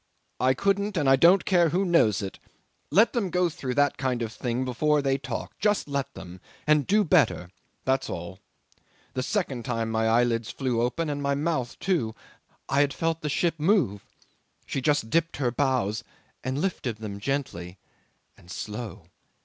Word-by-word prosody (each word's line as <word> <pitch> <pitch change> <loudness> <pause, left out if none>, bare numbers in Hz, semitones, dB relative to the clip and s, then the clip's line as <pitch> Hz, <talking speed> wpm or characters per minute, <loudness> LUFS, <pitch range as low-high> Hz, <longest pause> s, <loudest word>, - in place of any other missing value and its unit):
I 130 +1 +3
couldn't, 200 0 0
and 145 -4 +1
I 135 - +7
don't 170 +7 +5
care 175 -3 +4
who 185 +5 +1
knows 115 - +3
it. 95 - -6 0.5
Let 210 +9 +4
them 220 -6 0
go 180 0 +2
through 130 -5 -4
that 145 -1 +2
kind 130 -3 0
of 115 -1 -5
thing 125 +1 -2
before 150 +4 +2
they 135 -1 +1
talk. 130 -3 -5
Just 210 -5 +1
let 140 -2 -2
them 90 0 -10 0.2
and 150 -2 +3
do 210 +2 +4
better 145 - +2 0.3
that's 130 0 +1
all. 85 +1 -6 0.7
The 130 - -1
second 135 - -2
time 115 -3 -2
my 110 0 +1
eyelids 115 0 +2
flew 125 -4 -1
open 125 +7 -1
and 145 -1 -3
my 140 0 +1
mouth 145 -5 -1
too. 150 - 0 0.5
I 140 +1 +3
had 140 -1 +1
felt 165 0 -1
the 150 - -2
ship 165 +2 0
move. 150 - +2 0.6
She 135 - -3
just 145 -5 +1
dipped 165 0 +1
her 125 -4 0
bows 120 -4 0 0.4
and 130 +1 -2
lifted 145 - -2
them 105 -2 -6
gently 100 -8 -3 0.6
and 85 - -20
slow! 105 +3 -6
135 Hz, 175 wpm, -26 LUFS, 115-165 Hz, 0.7 s, I